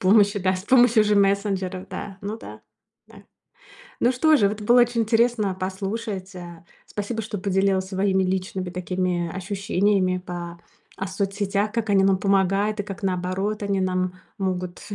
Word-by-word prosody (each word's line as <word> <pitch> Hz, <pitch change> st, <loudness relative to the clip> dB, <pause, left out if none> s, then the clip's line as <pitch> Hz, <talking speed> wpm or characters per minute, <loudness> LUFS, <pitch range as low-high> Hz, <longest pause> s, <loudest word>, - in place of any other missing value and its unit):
помощью, 205 Hz, 0 st, +4 dB
да, 185 Hz, 0 st, +2 dB
с 185 Hz, -, -8 dB
помощью 240 Hz, -3 st, +5 dB
же 210 Hz, 0 st, +2 dB
мессенджеров, 195 Hz, -2 st, +1 dB
да, 195 Hz, +1 st, -6 dB
ну 210 Hz, +3 st, -4 dB
да, -, -, -11 dB, 0.5 s
да. -, -, -16 dB, 0.8 s
Ну 240 Hz, -, +4 dB
что 310 Hz, +5 st, +4 dB
же 200 Hz, -7 st, +4 dB
вот 210 Hz, +1 st, -5 dB
было 240 Hz, +4 st, +5 dB
очень 240 Hz, -1 st, +2 dB
интересно 225 Hz, -3 st, +2 dB
послушать, 195 Hz, +1 st, -4 dB
а. 175 Hz, -1 st, -10 dB, 0.2 s
Спасибо 220 Hz, +2 st, -4 dB
что 210 Hz, -1 st, -5 dB
поделилась 195 Hz, 0 st, +1 dB
своими 190 Hz, 0 st, +1 dB
личными 185 Hz, 0 st, -2 dB
такими, 180 Hz, -1 st, -2 dB
ощущениями 190 Hz, 0 st, 0 dB
по 175 Hz, -1 st, -7 dB, 0.4 s
о 190 Hz, -, -3 dB
соцсетях, 200 Hz, +1 st, -1 dB
как 230 Hz, -2 st, -1 dB
они 195 Hz, -1 st, +4 dB
нам 195 Hz, -1 st, +4 dB
помогают 195 Hz, +2 st, +1 dB
и -, -, 0 dB
как, 195 Hz, -1 st, -8 dB
наоборот, 190 Hz, +3 st, -1 dB
они 200 Hz, -1 st, 0 dB
нам 185 Hz, -1 st, 0 dB, 0.3 s
могут 180 Hz, -2 st, -3 dB
195 Hz, 155 wpm, -24 LUFS, 185-210 Hz, 0.8 s, помощью